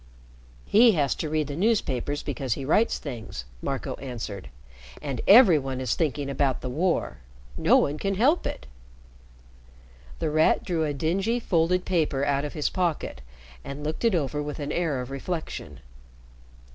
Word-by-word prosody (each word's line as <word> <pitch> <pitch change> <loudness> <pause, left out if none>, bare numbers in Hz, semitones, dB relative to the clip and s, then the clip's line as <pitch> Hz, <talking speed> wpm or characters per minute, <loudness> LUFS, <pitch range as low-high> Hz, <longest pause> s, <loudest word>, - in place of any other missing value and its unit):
"He 230 +1 +6
has 145 -6 +1
to 155 - -4
read 155 0 0
the 145 - -5
newspapers 145 - 0
because 130 -3 -2
he 135 - -6
writes 215 - +2
things," 115 - -7 0.2
Marco - - -3
answered. 110 - -6 0.5
"And 135 -5 -4
every 200 - +8
one 135 -1 -4
is 130 -3 0
thinking 145 -3 -1
about 135 -1 0
the 125 - -4
war. 130 - 0 0.4
No - - +4
one 145 +2 0
can 195 0 -1
help 275 - +3
it." - - -6 1.5
The 160 -2 -2
Rat 155 +1 +3
drew 165 -4 -1
a 150 - -1
dingy, 195 - 0
folded 180 -3 +1
paper 150 -6 +1
out 140 0 +1
of 145 - -6
his 150 - -1
pocket 170 - -2 0.4
and 140 +1 -7
looked 155 +7 -4
it 230 -5 +3
over 150 -2 -1
with 150 0 -5
an 145 -1 -4
air 155 -7 -1
of 125 +1 -7
reflection. 160 +4 -5
150 Hz, 160 wpm, -26 LUFS, 135-175 Hz, 1.5 s, every